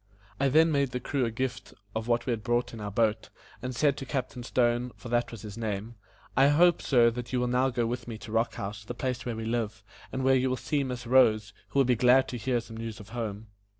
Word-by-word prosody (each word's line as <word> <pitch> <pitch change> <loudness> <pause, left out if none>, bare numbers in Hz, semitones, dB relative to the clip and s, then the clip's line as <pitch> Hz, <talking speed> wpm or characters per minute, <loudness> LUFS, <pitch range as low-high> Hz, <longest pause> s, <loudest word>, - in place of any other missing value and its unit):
I 140 0 +3
then 160 +4 +5
made 140 -4 +1
the 125 - -1
crew 130 +1 -1
a - - 0
gift 125 +1 -4 0.2
of 110 +1 -3
what 120 0 +1
we 125 - 0
had 115 -2 -1
brought 120 +1 0
in 115 - -7
our 105 - -3
boat, 110 +1 0 0.3
and 125 0 -4
said 140 +2 +2
to 135 - -5
Captain 130 -2 -3
Stone, 120 0 +1
for 120 - -10
that 120 0 +1
was 115 -3 -9
his 105 +1 -8
name: 110 0 -3 0.4
"I 135 +2 +6
hope, 170 +4 +5
sir, 120 -3 +4
that 120 0 -6
you 125 - +1
will 125 - +1
now 125 +2 +2
go 120 -2 0
with 120 +1 -3
me 115 -2 -5
to 110 - -10
Rock 115 +1 +1
House, 100 +1 -5
the 120 +3 -6
place 125 -1 -3
where 120 - -2
we 110 0 -5
live, 110 -2 -2 0.3
and 130 - -2
where 135 0 +5
you 130 0 +2
will 130 - 0
see 145 +1 -1
Miss 125 -2 -5
Rose, 110 -4 +4 0.2
who - - -4
will 135 - +5
be 125 0 +3
glad 125 +3 +5
to 125 - -4
hear 120 +2 0
some 115 -1 -10
news 115 -1 -6
of 105 0 -12
home." 110 -2 -5
120 Hz, 260 wpm, -28 LUFS, 115-130 Hz, 0.4 s, I